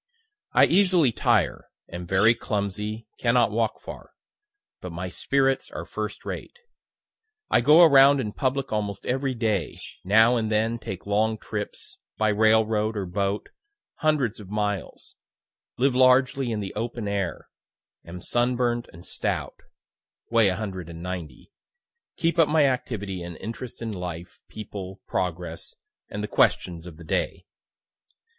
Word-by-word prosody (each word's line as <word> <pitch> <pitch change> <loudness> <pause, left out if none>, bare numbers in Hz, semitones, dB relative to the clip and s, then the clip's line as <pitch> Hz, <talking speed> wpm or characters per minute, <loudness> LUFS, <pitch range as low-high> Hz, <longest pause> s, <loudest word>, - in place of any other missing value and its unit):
I - - +7
easily 180 -7 +4
tire, - - +1 0.2
am 85 0 -6
very 95 +5 +5
clumsy, 105 +1 -3
cannot 120 -1 +3
walk 110 +1 0
far; - - -10 0.7
but 90 - -6
my 90 +2 -5
spirits 135 +6 +1
are - - -6
first - - -5
rate. - - -6 0.9
I - - +5
go 150 +7 +7
around 140 -2 +7
in 105 -5 -3
public 135 +1 -1
almost 105 -2 -3
every 130 +1 -1
day 110 -5 -1 0.2
now 110 +5 +5
and 110 -1 -1
then 110 +2 +1
take 95 -4 -7
long 110 +2 +1
trips, 105 -1 -6 0.2
by 110 0 +2
railroad 110 0 +2
or 100 - -2
boat, 100 +3 -2 0.5
hundreds 145 -9 +1
of 100 -3 -11
miles 105 -2 -3 0.6
live 135 +1 +2
largely 130 0 +4
in 105 -2 -2
the 95 - -5
open 115 0 -4
air 100 -3 -3 0.6
am 90 +2 -9
sunburnt 120 +1 0
and 85 +2 -14
stout, - - -2 0.7
(weigh 115 -4 +5
190) 90 - -6 0.7
keep 170 +1 0
up 165 - +6
my 155 -1 +4
activity 105 -8 -2
and 85 -1 -7
interest 115 +4 -7
in 115 - -3
life, 90 -3 -7
people, 100 -3 -8
progress, 85 -2 -4 0.3
and 105 0 -5
the - - -2
questions 85 -4 +1
of 80 -3 -11
the 85 - -11
day. 80 - -2
110 Hz, 135 wpm, -25 LUFS, 95-125 Hz, 0.9 s, I